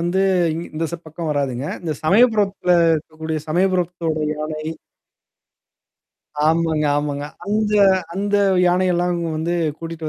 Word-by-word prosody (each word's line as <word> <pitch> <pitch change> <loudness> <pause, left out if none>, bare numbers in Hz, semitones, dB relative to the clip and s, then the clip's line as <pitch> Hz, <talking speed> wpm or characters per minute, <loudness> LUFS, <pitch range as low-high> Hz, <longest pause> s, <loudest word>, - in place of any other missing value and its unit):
வந்து 175 +3 0 0.3
இங் 165 +2 -4
இந்த 160 +1 -2
ச - - -1
பக்கம் 160 +1 -5
வராதுங்க. 135 -3 -1 0.2
இந்த 165 -3 -2
சமயபுரத்துல 205 -1 +3 0.3
இருக்கக்கூடிய 160 0 -5
சமயபுரத்தோட 175 -1 0 0.2
யானை. 155 0 -5 1.8
ஆமாங்க, 160 -1 +1
ஆமாங்க. 145 -1 -2 0.2
அந்த 210 +1 0 0.4
அந்த 205 +2 0 0.3
யானையெல்லாம் 180 0 +2 0.2
வந்து 165 +2 -1 0.2
கூட்டிட்டு 165 -1 -6
165 Hz, 105 wpm, -20 LUFS, 155-185 Hz, 1.8 s, சமயபுரத்துல